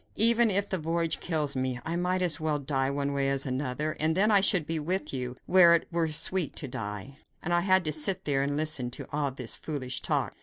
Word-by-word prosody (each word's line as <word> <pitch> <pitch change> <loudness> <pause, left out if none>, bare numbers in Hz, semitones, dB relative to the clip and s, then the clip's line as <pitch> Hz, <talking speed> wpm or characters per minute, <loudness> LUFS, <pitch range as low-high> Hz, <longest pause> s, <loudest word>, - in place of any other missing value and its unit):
Even 230 +1 +6
if 200 0 +2
the 190 - -2
voyage 165 +1 -1
kills 150 -5 -2
me, 130 -1 -2
I 165 - -3
might 180 +1 -1
as 165 -4 +1
well 155 -1 -1
die 135 -1 -1
one 140 0 -2
way 140 -1 0
as 135 -1 +1
another; 135 +3 -3
and 160 +2 0
then 210 +3 +3
I 200 -2 +5
should 190 -5 +3
be 160 0 -2
with 180 +4 -2
you, 125 -1 -5
where 175 -2 +6
it 165 - -2
were 170 -1 0
sweet 160 +2 -2
to 145 - -5
die." 115 +4 -7 0.2
And 175 - -2
I 175 - +3
had 185 -1 +2
to 155 - +1
sit 155 +5 +1
there 140 -2 0
and 145 +1 -2
listen 150 -5 0
to 125 - -8
all 145 -1 -1
this 125 -3 -3
foolish 130 -5 -4
talk! - - -1
155 Hz, 235 wpm, -28 LUFS, 135-175 Hz, 0.2 s, Even